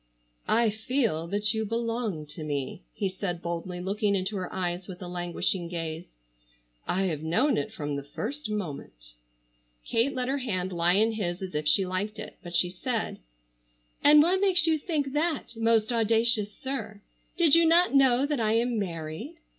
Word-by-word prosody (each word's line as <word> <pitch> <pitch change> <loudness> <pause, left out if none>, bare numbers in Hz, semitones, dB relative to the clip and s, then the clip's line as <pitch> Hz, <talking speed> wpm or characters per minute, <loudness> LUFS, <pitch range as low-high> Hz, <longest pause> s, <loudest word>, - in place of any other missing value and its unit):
"I 230 -1 +3
feel 220 - -1
that 205 +3 +1
you 220 0 -1
belong 230 -6 -2
to 155 +2 -9
me," 145 -3 -3
he 195 - -2
said 185 -2 -3
boldly 170 +1 -4
looking 200 +2 0
into 190 +2 -2
her 185 -2 -4
eyes 180 -1 -3
with 180 -2 -8
a 180 - -7
languishing 175 0 -2
gaze. 165 - -5 0.7
"I 190 +2 +1
have 160 -6 -1
known 200 - +2
it 145 - -2
from 145 -1 -4
the 140 - -3
first 225 - -5
moment." 140 - -5 0.7
Kate 235 +5 +1
let 250 -1 -1
her 275 +2 0
hand 185 -7 -2
lie 170 +1 +3
in 220 +4 +4
his 190 -4 -3
as 185 - -6
if 150 0 -2
she 185 +6 +4
liked 195 +4 -3
it, 215 - -8
but 175 -1 -7
she 175 +1 +2
said: 225 +5 -3 0.8
"And 295 +1 +8
what 370 +3 +2
makes 370 -4 +4
you 320 -2 +2
think 290 -4 -2
that, 300 -5 -1
most 225 0 +2
audacious 225 -2 +2
sir? 220 -4 -5 0.4
Did 335 -5 +4
you 335 0 +7
not 345 +1 +4
know 265 -1 +5
that 290 -2 -1
I 220 -1 +2
am 235 0 +1
married?" 170 - -5
210 Hz, 180 wpm, -28 LUFS, 175-245 Hz, 0.8 s, And